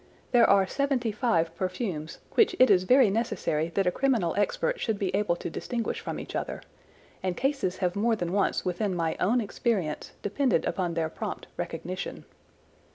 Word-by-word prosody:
There 240 -2 +6
are 195 -1 +5
seventy 260 0 0
five 170 -7 +1
perfumes, 185 -4 -3
which 425 -5 +4
it 255 - +6
is 185 0 +4
very 250 -2 +5
necessary 170 -7 -1
that 195 - +2
a 180 - +3
criminal 230 -9 +1
expert 485 - 0
should 220 -3 -1
be 190 -2 -2
able 200 -3 +1
to - - -6
distinguish 235 +7 -3
from - - -5
each - - -7
other, - - -3 0.6
and 185 -2 -2
cases 270 -9 0
have 180 - 0
more 225 +3 +2
than 175 -4 -3
once 200 0 +1
within 185 +1 -1
my 165 -2 0
own 235 +7 +3
experience 200 -7 -2
depended 245 +6 +1
upon 175 -3 -1
their 165 -1 0
prompt - - -5
recognition. 185 +2 -5
200 Hz, 170 wpm, -28 LUFS, 175-235 Hz, 0.6 s, There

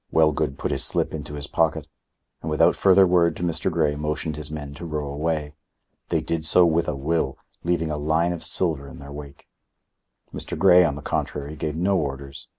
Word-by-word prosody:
Wellgood 75 -3 +2
put - - -2
his - - +1
slip - - 0
into 75 -1 -6
his 70 -1 -4
pocket, - - 0 0.6
and 80 - -4
without 75 - +4
further 95 0 +5
word 85 -2 +3
to - - -6
Mr. 85 +2 0
Grey 80 -3 +1
motioned 75 +1 -2
his 75 -1 -6
men 75 -2 -6
to 80 - -10
row 75 -2 -3
away. 75 +1 -2 0.6
They - - +1
did 85 -1 -2
so 90 +3 +5
with 85 0 +2
a 75 - -1
will, 70 -1 -1 0.3
leaving 80 -2 0
a 75 - -3
line 80 +4 +1
of 85 - -6
silver 80 -6 -1
in 70 - -11
their 70 +1 -10
wake. 70 -1 -10 0.9
Mr. - - -4
Grey, 90 -2 +7
on 75 -5 0
the 75 - -9
contrary, 75 +1 -3
gave 75 0 -3
no 95 +3 +1
orders. 70 -2 -5
75 Hz, 200 wpm, -24 LUFS, 75-85 Hz, 0.9 s, Grey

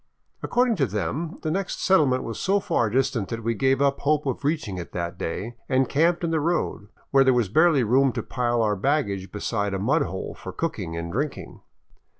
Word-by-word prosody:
Ac - - -2
cording 245 -1 +3
to 135 -5 +2
them, 130 - -3
the 155 - -1
next 195 +3 -2
settlement 145 -9 +3
was 115 - -5
so 200 +1 +2
far 120 - 0
distant 120 -3 0
that 115 0 -4
we 115 +1 0
gave 135 +4 +2
up 140 0 +1
hope 150 +1 +1
of 135 0 -3
reaching 140 - -1
it 85 - -8
that 85 0 -3
day 110 +7 -5
and 130 -1 +2
camped 170 +6 +2
in 165 - 0
the 160 - +1
road, 150 -9 -1 0.2
where 135 -1 +6
there 130 -1 +4
was 120 -6 +1
barely 155 - +4
room 130 +4 +3
to - - -3
pile 120 -2 0
our 105 -1 +1
baggage 100 -5 -1
beside 105 -1 -2
a - - 0
mud 95 - +2
hole - - -4
for - - -8
cooking 80 0 -3
and 85 0 -4
drinking. 140 - -4
130 Hz, 210 wpm, -25 LUFS, 105-155 Hz, 0.2 s, where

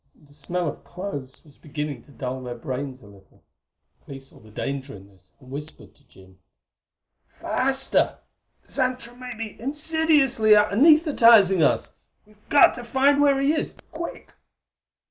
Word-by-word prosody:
The 145 -2 -20
smell 170 +4 -3
of 145 - -6
cloves 145 -9 -8
was 145 -2 -21
beginning 150 -4 -6
to - - -19
dull 130 +1 -5
their 125 -1 -6
brains 130 +1 -6
a - - -15
little. 100 -2 -20 0.6
Clee 140 - -9
saw 135 0 -15
the 110 - -18
danger 135 +4 -5
in 100 0 -14
this, 95 -2 -21
and 130 -2 -16
whispered 150 +3 -8
to 140 - -29
Jim: 95 -4 -20 1.0
"Faster! 270 +1 0 0.5
Xantra 255 -3 -2
may 250 -1 -8
be 220 -1 -8
insidiously 290 -5 +2
anaesthetizing 230 - +5
us! 145 - +1 0.3
We've 210 0 -26
got 290 - +6
to 240 - -7
find 270 +4 +2
where 280 -2 +3
he 275 +2 +2
is 310 - -3 0.2
quick!" 335 +1 -8
190 Hz, 145 wpm, -24 LUFS, -, 1.0 s, got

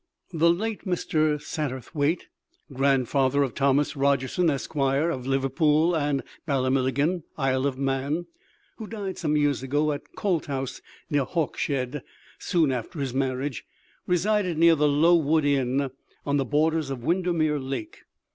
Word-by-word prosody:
The 165 +1 +4
late 215 +5 -3
Mr. 155 -4 +1
Satterthwaite, 145 +2 -2 0.5
grandfather 135 +1 +2
of 130 - -3
Thomas 140 +2 +2
Rogerson, 140 +4 +1
Esq., 140 +2 -3
of 135 -1 0
Liverpool 150 +5 +2
and 145 -3 0 0.2
Ballamillaghyn, 135 +4 +1 0.2
Isle 135 -1 +1
of 130 -2 -3
Man, 140 +5 -1 0.5
who 220 - -7
died 205 -4 -5
some 150 -3 +1
years 145 -3 +1
ago 145 +3 0
at 145 - -3 0.2
Coulthouse, 140 -9 -2 0.3
near 145 -2 +2
Hawkshead, 140 -3 -2 0.4
soon 165 -7 +1
after 130 +6 -4
his 135 -3 -2
marriage, 130 -1 -2 0.4
resided 180 -1 +1
near 165 +1 +6
the 150 -1 +3
Low 155 +4 +5
Wood 155 -1 +2
Inn, 135 -1 +1 0.3
on 145 0 +1
the 135 - 0
borders 155 +2 +1
of 130 -3 -5
Windermere 165 -3 +1
Lake. 135 - -5
145 Hz, 135 wpm, -26 LUFS, 135-165 Hz, 0.5 s, near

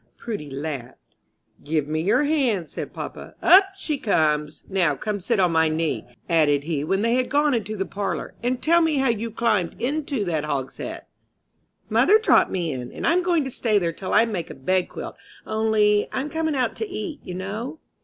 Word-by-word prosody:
Prudy 205 -11 -5
laughed. 135 -3 -7 0.5
"Give 150 -1 -1
me 155 +1 -1
your 200 - +3
hands," 255 - +1
said - - -6
papa. - - -8
"Up 385 +2 +7
she 305 -7 -2
comes! 150 -6 +1
Now, 180 -7 +1
come 210 +6 -3
sit 215 +3 0
on 180 -2 +3
my 160 -1 +3
knee," 155 -8 -1 0.2
added 150 -4 +3
he, 150 -2 -2
when 195 +6 0
they 230 +1 +2
had 250 0 +1
gone 290 +1 +3
into 215 -2 -2
the 195 -2 -2
parlor, 200 +1 -4
"and 245 +1 0
tell 335 +4 +4
me 320 -3 +2
how 265 -1 +2
you 230 0 -1
climbed 215 -6 0
into 275 -3 -1
that 160 -4 -1
hogshead." 140 -3 -4 0.8
"Mother 425 - +5
dropped 440 - +4
me 170 -4 -2
in, 125 -2 -5
and - - -5
I'm 350 +2 +3
going 345 -4 +2
to 265 - -5
stay 225 -3 +1
there 170 -4 0
till 185 - -6
I 225 - +5
make 200 -7 -4
a - - -8
bedquilt, 180 +7 -2 0.3
only 215 -1 +2
I'm 280 +3 -3
coming 320 -2 -1
out 250 -3 0
to 440 - -3
eat, 360 -5 -5
you 180 - -6
know." 215 - -5
210 Hz, 195 wpm, -24 LUFS, 160-265 Hz, 0.8 s, Up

